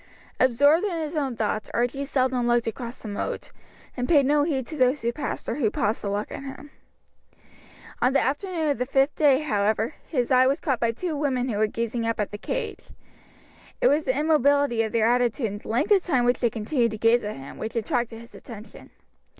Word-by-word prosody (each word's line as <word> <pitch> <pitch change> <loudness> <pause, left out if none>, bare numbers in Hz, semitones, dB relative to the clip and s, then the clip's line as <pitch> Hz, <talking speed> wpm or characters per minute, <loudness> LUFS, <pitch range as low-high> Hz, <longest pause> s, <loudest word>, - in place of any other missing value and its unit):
Absorbed 285 - +4
in 365 -5 -1
his 315 0 -4
own 275 -5 -1
thoughts 215 -1 -2
Archie 245 +4 0
seldom 255 -3 0
looked 240 0 +2
across 235 +2 -5
the - - -10
moat, 205 -1 -4 0.4
and 250 -1 -3
paid 290 -5 +5
no 295 +2 +3
heed 285 -4 -1
to 310 - -8
those 255 0 +2
who 235 +1 0
passed 285 +3 -5
or - - -2
who 240 -7 +2
paused 210 +1 -1
to 200 - -3
look 205 +1 -3
at - - -6
him. 275 +1 -9 1.3
On 250 - +4
the 275 - +3
afternoon 320 +3 -1
of 280 - -1
the 250 - -1
fifth 275 +2 +2
day, 285 -2 +4
however, 220 -2 0 0.2
his 250 -4 -1
eye 255 0 +5
was 275 +2 +1
caught 265 -6 -1
by 235 -1 +1
two 320 +7 -4
women 265 -3 -1
who 210 -3 -2
were 215 - +3
gazing 230 +1 -3
up 230 - -1
at 210 - -1
the 205 - -7
cage. - - -4 0.9
It - - +4
was 300 +2 +2
the 260 0 0
immobility 285 -5 +3
of 220 -1 -2
their 225 -2 +2
attitude 240 +1 +1
and 205 +1 -7
the - - -13
length 245 - 0
of 400 -2 +6
time 260 -8 +1
which 245 +1 +2
they 240 - +2
continued 230 +3 0
to 220 - -6
gaze 230 +3 +3
at 210 +1 -4
him, 135 0 -10
which 220 +1 -5
attracted 230 0 -2
his 235 +1 -15
attention. 225 -2 -12
250 Hz, 220 wpm, -25 LUFS, 230-285 Hz, 1.3 s, of